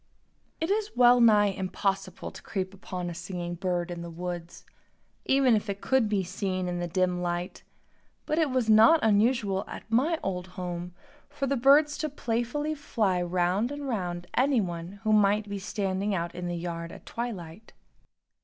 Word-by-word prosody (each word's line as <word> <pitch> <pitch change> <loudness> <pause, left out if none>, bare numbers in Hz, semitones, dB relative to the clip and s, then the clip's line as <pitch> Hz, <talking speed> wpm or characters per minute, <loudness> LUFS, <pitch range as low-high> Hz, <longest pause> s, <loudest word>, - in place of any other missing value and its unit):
It 325 +4 -1
is 425 0 0
well 245 0 +6
nigh 210 -3 +6
impossible 190 0 -3
to - - -11
creep 190 -1 -4
upon 185 -2 -6
a 175 - -4
singing 175 0 -5
bird 175 0 -2
in 170 -1 -5
the 170 - -6
woods, 175 0 -6 0.6
even 265 -3 +4
if 210 0 -2
it 200 0 -3
could 260 -3 +2
be 200 -2 +1
seen 185 0 -3
in 175 0 -2
the 175 - -2
dim 180 0 0
light, 175 0 -3 0.6
but 305 +2 0
it 315 -3 +2
was 255 -3 0
not 225 +9 +7
unusual, 210 -2 +2
at - - -8
my 290 +9 +3
old 180 -1 -3
home, 175 -1 -5 0.3
for 275 - -3
the 275 +1 0
birds 285 +4 +4
to 310 - -1
playfully 255 +3 -2
fly 215 -11 0
round 180 +6 0
and 290 -1 -5
round 180 -7 -3
anyone 195 -10 0
who 215 -1 +2
might 210 0 +3
be 200 0 -4
standing 195 0 -2
out 170 -1 -3
in 175 0 -5
the 175 0 -3
yard 170 -1 -5
at - - -12
twilight. 215 -5 -6
195 Hz, 170 wpm, -28 LUFS, 180-240 Hz, 0.6 s, not